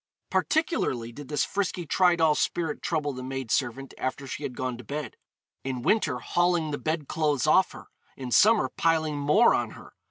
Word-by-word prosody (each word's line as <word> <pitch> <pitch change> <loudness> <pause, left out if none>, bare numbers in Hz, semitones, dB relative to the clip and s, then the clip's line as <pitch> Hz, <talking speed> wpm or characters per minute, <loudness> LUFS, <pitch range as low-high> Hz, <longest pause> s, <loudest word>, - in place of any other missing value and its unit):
Particularly 305 - 0
did 140 +3 -10
this 150 0 0
frisky 185 -3 -2
Tridoll 170 -2 +3
spirit 160 -1 -1
trouble 150 -4 -1
the 130 - -7
maid 130 -2 -5
servant 135 +1 -1
after 130 +1 -3
she 135 - -6
had 125 - -5
gone 130 -1 -2
to - - -9
bed 145 +4 -5 0.5
in 130 -2 -4
winter 160 - +2
hauling 175 +1 +1
the 145 - -3
bed 155 -2 -2
clothes 150 -4 0
off 185 +5 +4
her; - - -11 0.3
in 130 -2 -6
summer 215 - +5
piling 160 -3 +1
more 150 +12 +4
on - - 0
her. - - -14
150 Hz, 180 wpm, -27 LUFS, 130-170 Hz, 0.5 s, summer